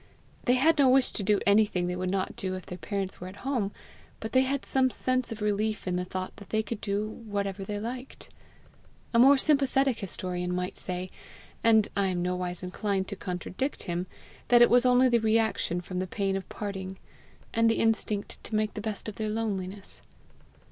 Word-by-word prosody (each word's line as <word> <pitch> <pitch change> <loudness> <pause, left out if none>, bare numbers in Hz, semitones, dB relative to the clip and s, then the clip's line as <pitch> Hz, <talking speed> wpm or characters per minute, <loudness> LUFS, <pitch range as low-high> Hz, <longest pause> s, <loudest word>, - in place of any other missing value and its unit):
They 250 - +4
had 310 +4 +4
no 270 -2 +6
wish 260 0 +4
to - - -4
do 200 0 +3
anything 200 -3 +3
they 180 0 -2
would 185 0 -2
not 190 0 -1
do 185 -1 -3
if 185 - -7
their 180 - -8
parents 195 -3 -4
were 180 - -5
at 195 +6 -11
home, 240 -8 0 0.5
but 220 - -5
they 260 - +5
had 270 +1 -1
some 260 -1 +2
sense 255 0 -1
of 220 -1 -5
relief 210 0 0
in 180 - 0
the 180 0 -1
thought 185 0 -5
that 200 - -12
they 220 0 +1
could 215 0 -5
do 205 0 -1
whatever 200 -3 -4
they 205 +1 -4
liked. 250 +4 -6 0.9
A 230 - +5
more 275 +3 +8
sympathetic 270 -3 +2
historian 180 -2 -3
might 180 0 -2
say, 180 0 -5 0.5
and 220 -2 +5
I 200 -1 +2
am 180 -2 -1
nowise 180 0 -2
inclined 190 +1 -1
to 200 - -4
contradict 185 +8 -4
him, 175 +1 -3 0.4
that 240 -1 +7
it - - +5
was 245 +1 +6
only 250 +1 +6
the 240 -2 +4
reaction 220 -5 +1
from 180 0 -4
the 185 - -2
pain 195 0 -1
of 195 -1 -5
parting, 190 -2 -5 0.6
and 230 0 +4
the 225 - +3
instinct 220 -2 0
to 220 - -3
make 215 0 +1
the 210 - -5
best 215 -1 -4
of 215 - -6
their 215 -1 -2
loneliness. 200 -3 -4
205 Hz, 200 wpm, -28 LUFS, 185-230 Hz, 0.9 s, more